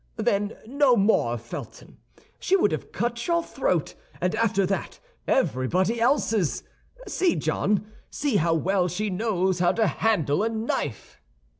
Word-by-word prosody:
Then 205 -2 0
no 265 0 +3
more 195 - +3
of 115 - -8
Felton; 120 - -9 0.4
she 385 - +2
would 400 +2 +3
have - - -4
cut 235 0 -2
your 340 -1 +2
throat, - - -1 0.3
and 180 - 0
after 200 -4 +1
that 195 +1 -3 0.3
everybody 185 - +1
else's. 225 - +1 0.4
See, 370 -3 +1
John, 210 +1 0 0.2
see 275 -7 0
how 165 -1 +2
well 180 +2 +1
she 200 +4 -2
knows 190 -2 0
how 175 0 +3
to 225 - +2
handle 195 -8 +1
a 225 - +1
knife." 220 - -4
210 Hz, 145 wpm, -25 LUFS, 180-235 Hz, 0.4 s, no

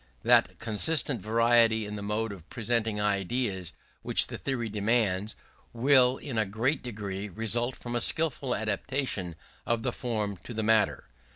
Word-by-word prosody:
That - - +4
constant 125 +2 0
variety 115 +1 +3
in 105 0 -6
the 105 - -6
mode 105 +2 -2
of 90 -4 -11
presenting 115 -2 -1
ideas 100 -2 -1 0.3
which - - +2
the - - -7
theory 130 -4 -2
demands, 105 -1 0 0.4
will 130 +1 +5
in 125 -6 -4
a 110 - +2
great 120 +8 0
degree 105 -4 -5
result 115 +5 -1
from 120 0 -6
a 120 - +2
skilful 140 -3 +2
adaptation 110 - -2 0.3
of 115 -1 -1
the - - 0
form 105 -5 -3
to 120 +6 -10
the 110 - -1
matter. 105 - +2
110 Hz, 155 wpm, -28 LUFS, 105-120 Hz, 0.4 s, will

